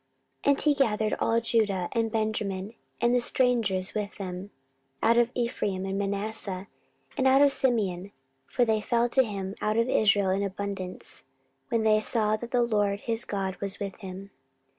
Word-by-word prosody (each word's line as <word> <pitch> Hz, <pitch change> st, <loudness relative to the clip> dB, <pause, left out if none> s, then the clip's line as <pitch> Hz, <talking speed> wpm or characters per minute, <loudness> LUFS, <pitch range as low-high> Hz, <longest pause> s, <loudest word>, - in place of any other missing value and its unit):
14:015:009 -, -, +4 dB
And 275 Hz, -, +2 dB
he 300 Hz, -, +4 dB
gathered 215 Hz, -2 st, 0 dB
all 230 Hz, 0 st, +2 dB
Judah 210 Hz, -6 st, +1 dB
and 225 Hz, -1 st, 0 dB
Benjamin, 215 Hz, -2 st, -2 dB, 0.3 s
and 240 Hz, +1 st, +2 dB
the 245 Hz, -, +3 dB
strangers 230 Hz, -7 st, +1 dB
with 210 Hz, -1 st, -4 dB
them 185 Hz, 0 st, -6 dB, 0.5 s
out 230 Hz, +1 st, +5 dB
of 240 Hz, 0 st, +3 dB
Ephraim 205 Hz, -6 st, -1 dB
and 195 Hz, +1 st, -2 dB
Manasseh, 200 Hz, -1 st, -3 dB, 0.5 s
and 265 Hz, -2 st, +2 dB
out 270 Hz, +2 st, +6 dB
of 285 Hz, -, +5 dB
Simeon: 200 Hz, -8 st, 0 dB, 0.4 s
for 245 Hz, -, +1 dB
they 220 Hz, -2 st, +1 dB
fell 235 Hz, +2 st, +1 dB
to 265 Hz, -, +4 dB
him 195 Hz, -4 st, -4 dB
out 215 Hz, +1 st, 0 dB
of 230 Hz, +1 st, +2 dB
Israel 205 Hz, -5 st, +3 dB
in 195 Hz, +1 st, 0 dB
abundance, 195 Hz, -2 st, -5 dB, 0.5 s
when 230 Hz, -3 st, +1 dB
they 215 Hz, -1 st, +4 dB
saw 215 Hz, -1 st, +1 dB
that 235 Hz, +2 st, -7 dB
the 245 Hz, -1 st, +2 dB
LORD 205 Hz, -3 st, 0 dB
his 230 Hz, 0 st, -1 dB
God 195 Hz, -2 st, -3 dB
was 200 Hz, 0 st, -2 dB
with 200 Hz, -2 st, -5 dB
him. 195 Hz, 0 st, -9 dB
215 Hz, 175 wpm, -27 LUFS, 195-235 Hz, 0.5 s, out